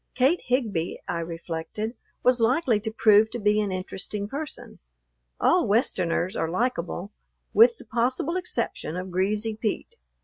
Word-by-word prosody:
Kate 270 +7 +3
Higbee, 220 -10 0
I 170 - -2
reflected, 170 +6 -5 0.3
was 250 -1 +3
likely 240 -1 +3
to 220 +1 -3
prove 220 -1 +5
to 240 - -4
be 210 0 +3
an 205 -2 -2
interesting 190 +2 -4
person. 290 +6 -5 0.6
All - - +3
Westerners 185 -5 +1
are 160 - -1
likable, 185 -2 -2 0.4
with 465 +1 +6
the - - -14
possible 250 +8 0
exception 355 - -3
of 185 0 -5
Greasy 210 +4 0
Pete. 215 -1 -3
215 Hz, 140 wpm, -26 LUFS, 185-245 Hz, 0.6 s, with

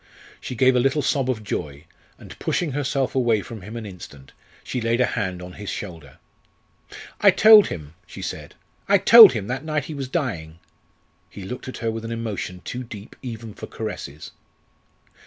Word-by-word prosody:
She 125 - -6
gave 130 +2 +4
a - - +4
little 135 +4 +1
sob 135 -1 0
of 110 -4 -2
joy, 75 -6 -5 0.3
and - - -13
pushing 170 -4 -1
herself 135 -1 -1
away 120 -5 +2
from 115 -3 -9
him 105 +5 -9
an 115 - -6
instant, 80 -8 -11 0.3
she 125 - -4
laid 115 +1 0
a 125 - +4
hand 95 -7 -3
on 90 0 -9
his 105 +1 -7
shoulder. 80 -9 -8 1.0
"I - - +6
told 215 -1 +8
him," 75 -2 -7
she - - -9
said - - -7 0.3
"I 200 - +6
told 215 - +9
him, 110 -5 -3
that 125 +6 -4
night 155 -3 -2
he 155 - -7
was 140 -3 -5
dying." 105 - -3 0.7
He 100 - -10
looked 125 +8 -7
at 130 - -6
her 115 -2 -2
with 115 0 -6
an 115 - -5
emotion 105 -6 -5
too 125 +1 -5
deep 110 -3 -11
even 115 -4 -7
for - - -9
caresses. 80 -9 -7
115 Hz, 185 wpm, -23 LUFS, 95-130 Hz, 1.0 s, told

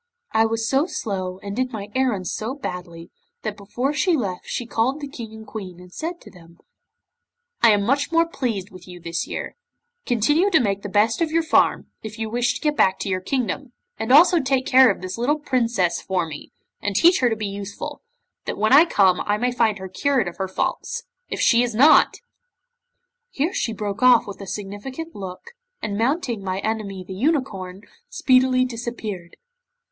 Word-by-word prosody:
I 225 0 +3
was 225 0 -1
so 275 +6 +2
slow, 185 - -4
and 200 0 -5
did 255 +1 -1
my 210 -3 -6
errands 240 -9 0
so 230 +5 -3
badly, 175 -9 -7 0.3
that 215 -2 -3
before 240 +7 -2
she 330 +2 +2
left 190 -8 -4
she 245 - -3
called 235 +5 0
the 285 - -5
King 235 -5 -8
and 220 0 -11
Queen 190 -5 -8
and 180 0 -14
said 335 +2 -5
to - - -14
them: 170 -2 -17 1.0
'"I 230 - +7
am 205 -1 +1
much 280 +8 +1
more 335 0 +4
pleased 230 - -3
with 185 -1 -13
you 180 -1 -10
this 170 0 -3
year. - - -5 0.5
Continue 295 - +3
to 335 - +5
make 200 -5 0
the 205 - -6
best 215 - +2
of 330 - +2
your 330 +1 +1
farm, 320 - +2
if 215 0 -8
you 220 -1 -4
wish 245 +1 +1
to - - -6
get 300 -2 +1
back 190 -8 +3
to - - -4
your 185 -1 -1
kingdom, 245 +3 -2 0.3
and 225 +2 -2
also 340 +5 +7
take 265 -2 0
care 260 -2 +7
of 195 - -1
this 185 +4 -5
little 285 +6 +1
Princess 235 - 0
for 185 -3 -1
me, 150 -2 -9 0.3
and 205 -1 -2
teach 345 - +5
her 250 - +3
to 225 - 0
be 215 -1 -4
useful, 200 0 -6 0.4
that - - -4
when 215 +4 +2
I 300 +4 +9
come 190 - +3
I 205 0 +2
may 245 +3 0
find 225 -4 +1
her 190 0 -7
cured 260 +3 0
of 175 - -7
her 190 - -2
faults. 185 - -3 0.3
If - - -4
she 235 -1 +4
is 240 -2 -1
not 280 +7 +6 0.6
" - - -55
'Here 320 - -1
she 235 - -1
broke 205 -1 -4
off 250 -2 +6
with 200 0 -8
a 195 - -8
significant 210 - -6
look, 190 - -8 0.3
and 205 - -3
mounting 235 - -1
my 185 -1 -2
enemy 205 -4 -3
the 190 - -6
unicorn, 205 - -2 0.3
speedily 255 -1 +3
disappeared. 225 -7 -6
225 Hz, 200 wpm, -22 LUFS, 195-265 Hz, 1.0 s, I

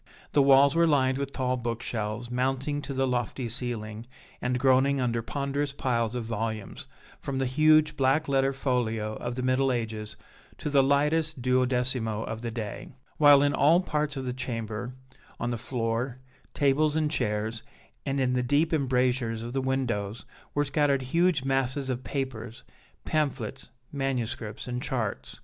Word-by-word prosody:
The 145 - +4
walls 140 +1 +6
were 170 0 +4
lined 135 -3 +2
with 140 0 -3
tall 130 -2 -1
book 120 -1 -3
shelves, 110 +1 -3
mounting 135 +3 -1
to 140 0 -5
the 135 0 +2
lofty 125 0 -2
ceiling, 115 -2 -4 0.3
and 125 0 0
groaning 135 +1 +3
under 120 -2 0
ponderous 140 +3 -2
piles 120 -4 -1
of 120 -2 -3
volumes, 110 -2 -4 0.3
from 135 - -4
the 135 - +1
huge 155 +3 +4
black 135 +3 +2
letter 135 -1 +2
folio 115 -5 -1
of 120 0 -4
the 125 - -3
Middle 130 +1 +2
Ages 110 -3 -3 0.4
to 150 - -4
the 140 -1 +5
lightest 150 +1 +1
duodecimo 125 -3 +1
of 110 0 -5
the 120 - -3
day; 110 -2 -6 0.3
while 145 -2 +7
in 145 0 +2
all 155 +6 +5
parts 150 -5 -1
of 130 - -4
the 125 - -2
chamber, 120 -1 -4 0.4
on 120 - -1
the - - -1
floor, 120 +1 -2 0.4
tables 145 +2 +2
and 155 -1 +1
chairs, 110 -4 -1 0.4
and 135 0 -1
in 125 -1 +1
the 125 - +1
deep 145 +6 +2
embrasures 125 -5 +1
of 120 +1 -6
the 135 - 0
windows, 120 -6 -2 0.3
were 145 0 +2
scattered 140 -1 +1
huge 165 +2 +2
masses 135 0 0
of 125 0 -4
papers, 125 -5 -5 0.4
pamphlets, 140 -9 -2 0.2
manuscripts 125 -6 -3
and 125 0 -3
charts. 110 - -3
130 Hz, 160 wpm, -27 LUFS, 115-140 Hz, 0.4 s, while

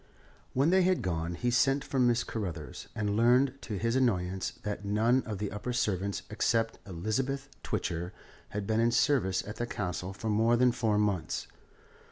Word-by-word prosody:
When 140 +6 +3
they 190 0 +5
had 185 0 +2
gone 85 -1 -2
he 120 +6 0
sent 135 +3 +3
for 135 - -2
Mrs. 120 -2 +3
Carruthers, 100 -8 -5
and 105 -1 -1
learned, 125 +4 +4
to 105 - -4
his 115 +5 0
annoyance, 95 -8 +1
that 105 0 -3
none 110 +6 +3
of 105 -2 -3
the 105 +1 -3
upper 105 +5 -4
servants 100 -4 -1
except 115 +1 +1
Elizabeth 130 +10 -2
Twitcher 90 -4 -2 0.4
had 105 -1 -4
been 110 +1 +1
in 115 +1 +4
service 115 -6 +2
at 105 - -6
the 120 - -2
Castle 90 -4 -3
for 105 +3 -4
more 115 +3 +3
than 125 0 +5
four 115 -3 +1
months. 105 -5 0
110 Hz, 175 wpm, -30 LUFS, 100-125 Hz, 0.4 s, they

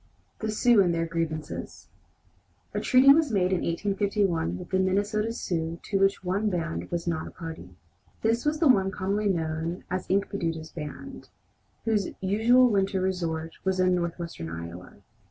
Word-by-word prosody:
THE 220 - -3
SIOUX 215 0 +4
AND 175 -2 +1
THEIR 165 0 0
GRIEVANCES 165 -2 -4 0.8
A - - -1
treaty 265 +1 +7
was 305 -3 +2
made 190 -3 +2
in 185 - +1
1851 195 - 0
with - - -9
the 190 - +2
Minnesota 205 +4 +1
Sioux 165 -6 -3
to 195 - -1
which 195 0 +2
one 195 +4 0
band 90 - -3
was 170 -1 -3
not 165 -2 -2
a - - -7
party. 160 - -9 0.5
This 225 +1 +2
was 300 +1 +1
the 320 - +4
one 195 -7 +4
commonly 200 +2 -1
known 165 0 -2
as 185 0 -2
Inkpaduta's 170 -5 -1
band, 165 - -8 0.6
whose 215 -4 +1
usual 225 +6 +4
winter 195 -3 +1
resort 165 -4 -2
was 190 -1 0
in 185 0 +4
northwestern 170 - -3
Iowa. 85 +2 -9
185 Hz, 155 wpm, -27 LUFS, 165-205 Hz, 0.8 s, treaty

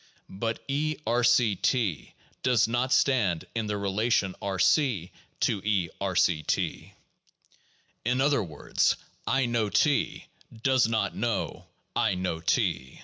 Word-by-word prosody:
But 110 +4 -4
{E)R°{T) 120 - +1 0.3
does 125 -4 +3
not 120 +3 -1
stand 105 - +2
in 115 -2 -2
the 105 0 -2
relation 100 0 0
R 100 -2 -2
c 100 - +2 0.3
to 100 - +1
(E)R 95 -2 -1
C 85 -2 +3
(T); - - -2 1.1
in 125 +3 0
other 140 -2 +3
words, 80 -5 0 0.3
I 135 -1 +2
know 120 -3 0
T 145 +6 +1 0.4
does 130 -3 +4
not 110 -3 -1
know 115 -1 -2 0.3
I 110 -5 +2
know 90 -3 -2
T. 65 -5 -1
110 Hz, 120 wpm, -27 LUFS, 95-125 Hz, 1.1 s, does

